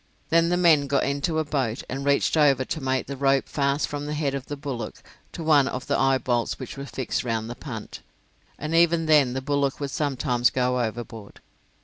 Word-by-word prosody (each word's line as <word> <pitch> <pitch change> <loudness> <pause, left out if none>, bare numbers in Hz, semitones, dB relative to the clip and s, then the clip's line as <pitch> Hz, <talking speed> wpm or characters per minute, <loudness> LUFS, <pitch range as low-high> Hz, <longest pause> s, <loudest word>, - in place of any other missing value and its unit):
Then 165 +1 +4
the 175 - +2
men 160 -5 +4
got 140 0 +1
into 140 +4 -1
a 160 - +2
boat, 130 -6 -2
and 135 +2 -4
reached 140 +2 +2
over 140 -4 +4
to 155 - -4
make 130 -1 0
the 140 - -6
rope 135 0 +2
fast 140 0 0
from 145 0 -5
the 150 - -3
head 145 -2 -1
of 135 -1 -5
the 145 - -5
bullock 135 -6 -6 0.3
to 165 - -7
one 150 -4 +4
of 125 -2 -4
the - - 0
eyebolts 130 -3 +1
which 130 - -7
were 140 0 -7
fixed 125 +1 -3
round 115 -1 -2
the - - -6
punt, 115 -7 -8 0.6
and 155 +2 -4
even 170 0 +4
then 150 -5 +4
the 130 0 -3
bullock 140 -1 0
would 140 -2 -3
sometimes 130 -4 +1
go 125 -1 0
overboard. 110 -2 -6
140 Hz, 210 wpm, -25 LUFS, 125-150 Hz, 0.6 s, Then